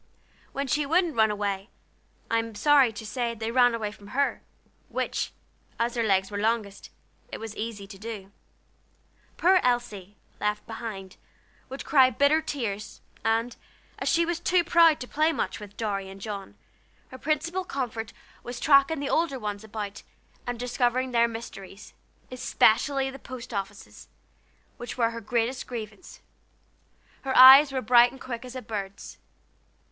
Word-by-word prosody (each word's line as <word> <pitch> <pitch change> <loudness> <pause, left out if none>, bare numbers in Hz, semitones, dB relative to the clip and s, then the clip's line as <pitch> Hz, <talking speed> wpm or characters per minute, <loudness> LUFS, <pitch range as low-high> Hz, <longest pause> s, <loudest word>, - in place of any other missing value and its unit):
When 275 +1 -3
she 295 +3 0
wouldn't 330 +2 +1
run 220 -1 +4
away, 205 0 -3 0.6
I 230 - +1
am 225 -1 -5
sorry 280 0 +5
to 220 0 -9
say 235 +2 -2
they 225 0 -4
ran 245 -1 +4
away 215 -2 -3
from 205 -1 -15
her, 280 0 +1 0.5
which, - - -2 0.5
as 235 +1 0
their 235 - 0
legs 195 -2 +1
were 205 - -3
longest, 215 -2 -2 0.4
it - - -5
was 225 -1 -7
easy 215 -2 -5
to 195 -1 -12
do. 210 -3 -7 1.1
Poor 370 +2 +5
Elsie, 215 -6 -2 0.2
left 210 0 -1
behind, 215 -4 -7 0.5
would 265 +1 -7
cry 265 -3 +5
bitter 285 +6 +3
tears, 230 -10 -5 0.2
and, 225 +2 0 0.4
as - - -1
she 335 0 +3
was 345 0 -2
too 350 0 +2
proud 335 -2 +5
to 250 - -5
play 310 +4 +2
much 320 - -3
with 205 -1 -12
Dorry 200 -3 -3
and 195 0 -11
John, 200 -1 -7 0.5
her 260 - -11
principal 330 +6 -1
comfort 240 -8 -4 0.3
was 245 0 -7
tracking 275 +1 +4
the 285 - -2
older 320 -4 +1
ones 210 -3 -5
about 210 -2 -6 0.5
and 245 -1 -3
discovering 250 +1 0
their 235 -1 +4
mysteries, 215 -3 -9 0.4
especially 255 +2 +2
the 270 - -10
post 250 -2 -9
offices, 200 0 -6 0.7
which 240 0 -7
were 230 -2 +2
her 230 0 -7
greatest 235 +3 -1
grievance. 230 +6 -8 1.0
Her 265 -1 -1
eyes 270 +3 +10
were 260 -1 -2
bright 240 +1 +6
and 265 - -13
quick 240 -3 -6
as 250 0 -10
a 255 - -6
bird's. 200 -3 -7
235 Hz, 155 wpm, -26 LUFS, 210-270 Hz, 1.1 s, eyes